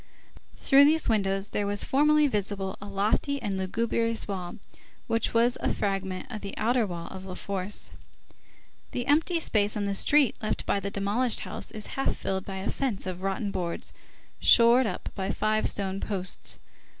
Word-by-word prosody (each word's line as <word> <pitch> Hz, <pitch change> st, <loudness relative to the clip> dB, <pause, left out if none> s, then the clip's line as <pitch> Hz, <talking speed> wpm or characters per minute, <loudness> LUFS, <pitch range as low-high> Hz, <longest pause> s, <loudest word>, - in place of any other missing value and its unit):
Through 275 Hz, +1 st, +6 dB
these 315 Hz, +2 st, +4 dB
windows 195 Hz, -2 st, +1 dB
there 205 Hz, -, -1 dB
was 205 Hz, 0 st, +3 dB
formerly 300 Hz, +2 st, +4 dB
visible 200 Hz, -5 st, -1 dB
a 205 Hz, -, -7 dB
lofty 210 Hz, +8 st, 0 dB
and 205 Hz, -5 st, -3 dB
lugubrious 230 Hz, +4 st, -1 dB
wall, 185 Hz, -3 st, -4 dB, 0.5 s
which 230 Hz, 0 st, 0 dB
was 235 Hz, +2 st, +2 dB
a -, -, +1 dB
fragment 195 Hz, -1 st, -2 dB
of 215 Hz, -3 st, -5 dB
the 200 Hz, -, -7 dB
outer 230 Hz, 0 st, +2 dB
wall 170 Hz, -2 st, -6 dB
of 190 Hz, 0 st, -9 dB
La 185 Hz, -1 st, -6 dB
Force. 200 Hz, +1 st, -4 dB, 1.0 s
The 245 Hz, -, -2 dB
empty 320 Hz, +4 st, +2 dB
space 210 Hz, -8 st, +1 dB
on 205 Hz, -, -1 dB
the 200 Hz, -, -1 dB
street 285 Hz, +5 st, +4 dB
left 215 Hz, -, -2 dB
by 200 Hz, -, +1 dB
the 200 Hz, +1 st, -4 dB
demolished 205 Hz, +5 st, 0 dB
house -, -, -6 dB
is 215 Hz, -1 st, -6 dB
half 270 Hz, -, 0 dB
filled 190 Hz, -1 st, -3 dB
by 195 Hz, -1 st, -5 dB
a 190 Hz, -, -2 dB
fence 255 Hz, -10 st, -2 dB
of 185 Hz, -1 st, -5 dB
rotten 195 Hz, +1 st, -2 dB
boards, 175 Hz, -3 st, -3 dB, 0.5 s
shored 235 Hz, +1 st, +6 dB
up -, -, -4 dB
by 190 Hz, -1 st, -3 dB
five 215 Hz, +1 st, +1 dB
stone 195 Hz, -1 st, -2 dB
posts. 195 Hz, -3 st, -2 dB
205 Hz, 175 wpm, -27 LUFS, 195-235 Hz, 1.0 s, Through